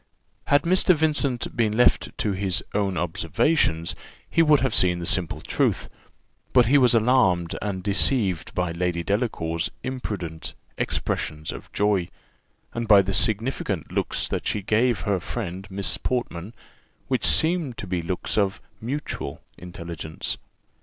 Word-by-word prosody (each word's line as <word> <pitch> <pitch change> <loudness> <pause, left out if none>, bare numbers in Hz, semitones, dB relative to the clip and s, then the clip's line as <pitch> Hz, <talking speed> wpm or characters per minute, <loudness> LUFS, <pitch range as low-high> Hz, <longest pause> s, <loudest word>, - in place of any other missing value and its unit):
Had 145 0 +4
Mr. 180 +1 +4
Vincent 145 -5 0
been 110 -3 +1
left 125 - +4
to 105 - 0
his 95 0 0
own 100 -3 0
observations, 85 - +1 0.3
he 165 - +2
would 150 -3 +5
have 130 - +1
seen 90 -1 +4
the 85 - -5
simple 90 -2 0
truth; - - 0 0.6
but 125 -2 +6
he 140 +6 +5
was 125 -2 +5
alarmed 110 -8 +3
and 95 -3 -3
deceived 100 -3 +1
by 90 -1 0
Lady 85 0 -1
Delacour's 85 -5 -1
imprudent 100 -11 -5 0.2
expressions 75 0 -2
of - - -10
joy, 100 -4 +1 0.6
and 115 -1 -3
by 100 -2 +7
the 95 +1 -2
significant 110 +6 0
looks - - -1
that - - -3
she 105 - -1
gave 110 0 +2
her 100 +2 0
friend 95 0 -5
Miss 100 0 0
Portman, 115 -5 -3 0.5
which 130 -2 0
seemed 160 -6 +2
to - - -5
be 90 -2 -2
looks 90 +5 -2
of 100 -1 0 0.2
mutual 125 - -4 0.2
intelligence. 85 -3 -6
100 Hz, 140 wpm, -24 LUFS, 90-125 Hz, 0.6 s, by